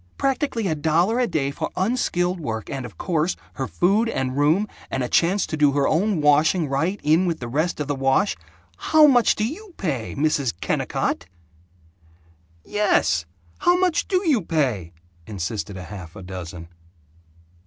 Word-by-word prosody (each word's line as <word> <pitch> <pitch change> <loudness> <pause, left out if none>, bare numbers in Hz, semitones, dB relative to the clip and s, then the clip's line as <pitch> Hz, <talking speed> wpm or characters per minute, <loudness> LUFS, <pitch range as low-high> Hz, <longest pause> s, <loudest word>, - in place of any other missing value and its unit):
practically 270 -4 -1
a 160 - +1
dollar 165 +9 +1
a 250 - +2
day 145 -5 -1
for - - -4
unskilled 185 -4 0
work 110 -8 -4
and, 135 -2 -4
of 100 -8 -17
course, 165 0 0 0.2
her 135 -2 -3
food 205 +6 +2
and 130 - -2
room 155 +9 +2 0.2
and 130 - -2
a - - -1
chance 180 +9 +2
to - - -4
do 145 -2 +3
her 140 -1 +2
own 185 +1 +1
washing 150 +3 +3
right 160 +9 -1
in 160 +5 +3
with 165 -2 -1
the 120 - -5
rest 155 +8 -1
of 150 - -2
the 145 - 0
wash. 135 +9 +1 0.4
HOW 310 -1 +5
MUCH 250 -5 +5
DO 215 - 0
YOU 365 - -9
PAY, 135 - -3
Mrs. 140 - +1
KENNICOTT?" 90 - -1 1.4
"Yes! 90 - +1 0.3
How 350 +1 +4
much 360 -3 +1
do 370 -1 0
you 270 -9 +3
pay?" 130 - -1 0.4
insisted 100 +1 -4
half 90 -2 -9
a 95 - -9
dozen. 90 -2 -8
155 Hz, 165 wpm, -23 LUFS, 130-205 Hz, 1.4 s, HOW